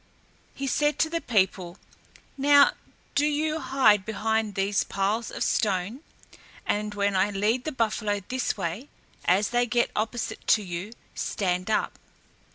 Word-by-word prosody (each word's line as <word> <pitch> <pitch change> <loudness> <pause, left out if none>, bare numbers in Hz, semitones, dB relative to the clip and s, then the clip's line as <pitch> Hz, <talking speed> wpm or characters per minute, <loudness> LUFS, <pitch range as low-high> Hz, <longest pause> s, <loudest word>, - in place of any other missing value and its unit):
He 275 - -4
said 295 +2 +1
to 315 - +1
the 335 0 -1
people, 190 -5 0 0.6
"Now, 285 +1 +6 0.4
do 285 - +2
you 305 +1 0
hide 220 -10 +3
behind 220 0 -1
these 195 0 +1
piles 205 +3 -1
of - - -3
stones, 205 +4 0 0.6
and 210 0 -1
when 200 -1 +1
I 190 +2 +3
lead 210 +5 0
the 310 - -2
buffalo 215 -5 -1
this 255 -2 -1
way, 195 - -4 0.4
as 195 +3 +3
they 245 0 +1
get 240 0 +1
opposite 220 +1 -3
to 215 - +4
you, 180 +4 -6 0.2
stand 185 0 -2
up." 215 - 0
215 Hz, 145 wpm, -26 LUFS, 200-255 Hz, 0.6 s, Now